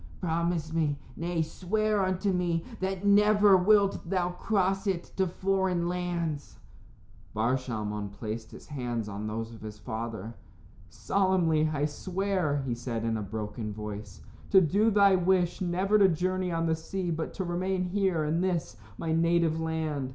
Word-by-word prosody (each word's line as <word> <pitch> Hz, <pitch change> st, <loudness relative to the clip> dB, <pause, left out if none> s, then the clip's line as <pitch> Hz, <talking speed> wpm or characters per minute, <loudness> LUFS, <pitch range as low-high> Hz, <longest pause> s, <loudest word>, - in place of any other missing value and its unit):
Promise 165 Hz, -2 st, -1 dB
me 155 Hz, -3 st, +1 dB, 0.2 s
nay, 170 Hz, 0 st, -1 dB
swear 210 Hz, +5 st, 0 dB
unto 185 Hz, +2 st, 0 dB
me 175 Hz, -2 st, 0 dB
that 190 Hz, +1 st, -2 dB
never 205 Hz, 0 st, +6 dB
wilt 195 Hz, -1 st, +3 dB
thou 180 Hz, -2 st, +1 dB
cross 195 Hz, +1 st, 0 dB
it 185 Hz, -3 st, 0 dB
to 190 Hz, -1 st, +2 dB
foreign 185 Hz, -1 st, 0 dB
lands." 175 Hz, -4 st, -3 dB, 0.8 s
Bar 115 Hz, +4 st, +2 dB
Shalmon 105 Hz, -5 st, -3 dB
placed 110 Hz, +1 st, -6 dB
his -, -, -12 dB
hands 120 Hz, -6 st, -3 dB
on 105 Hz, +1 st, -5 dB
those 115 Hz, +1 st, -4 dB
of 110 Hz, -, -12 dB
his 105 Hz, -1 st, -8 dB
father. 110 Hz, 0 st, -5 dB, 0.6 s
"Solemnly 175 Hz, -5 st, +2 dB
I 145 Hz, -1 st, 0 dB
swear," 180 Hz, -2 st, -1 dB
he 125 Hz, -, -1 dB
said, 115 Hz, -1 st, -4 dB
in 115 Hz, -1 st, 0 dB
a 110 Hz, -, -2 dB
broken 105 Hz, +1 st, -4 dB
voice, 105 Hz, 0 st, -7 dB, 0.3 s
"to 195 Hz, -, +7 dB
do 200 Hz, +6 st, +3 dB
thy 200 Hz, -2 st, +5 dB
wish 180 Hz, -1 st, +2 dB
never 190 Hz, +4 st, +2 dB
to 195 Hz, -, +7 dB
journey 185 Hz, +2 st, 0 dB
on 165 Hz, 0 st, 0 dB
the 160 Hz, -1 st, +2 dB
sea, 175 Hz, +2 st, -3 dB
but 160 Hz, 0 st, -3 dB
to 190 Hz, -, -2 dB
remain 185 Hz, +1 st, -1 dB
here 185 Hz, -3 st, 0 dB
in 155 Hz, +3 st, 0 dB
this, 170 Hz, -, -1 dB, 0.2 s
my 165 Hz, -, -2 dB
native 165 Hz, -1 st, +2 dB
land. 160 Hz, -4 st, -2 dB
170 Hz, 160 wpm, -29 LUFS, 130-190 Hz, 0.8 s, to